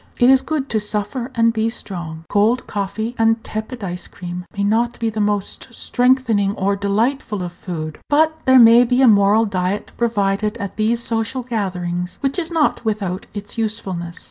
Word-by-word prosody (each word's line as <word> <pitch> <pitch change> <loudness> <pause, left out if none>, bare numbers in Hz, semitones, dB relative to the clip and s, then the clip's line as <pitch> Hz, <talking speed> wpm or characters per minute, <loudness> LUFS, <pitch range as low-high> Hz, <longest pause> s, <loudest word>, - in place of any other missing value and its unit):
It 245 +2 +5
is 265 0 +5
good 300 -4 -2
to 220 - +1
"suffer 210 +4 -3
and 230 -1 +3
be 225 0 0
strong." 170 -7 -6
Cold 220 +7 +2
coffee 205 +3 -3
and 225 0 +2
tepid 220 +2 -5
ice 180 -2 -4
cream 180 0 -7
may 200 - 0
not 230 +4 +1
be 230 -1 -1
the 215 0 -2
most 205 -1 -1
strengthening 245 -6 +1
or 200 +1 0
delightful 210 +1 -1
of 175 -1 -6
food, 155 -4 -6
but 315 +2 +3
there 260 0 +7
may 235 0 +8
be 250 +2 +2
a - - +7
moral 205 +1 +5
diet 190 0 -2
provided 210 -2 0
at 200 -1 -5
these 230 +2 0
social 230 +3 -1
gatherings 180 -6 -3
which 275 +5 0
is 330 -2 -2
not 320 -7 +1
without 205 -4 -2
its 205 +3 -6
usefulness. 185 -6 -3
215 Hz, 175 wpm, -20 LUFS, 195-235 Hz, -, may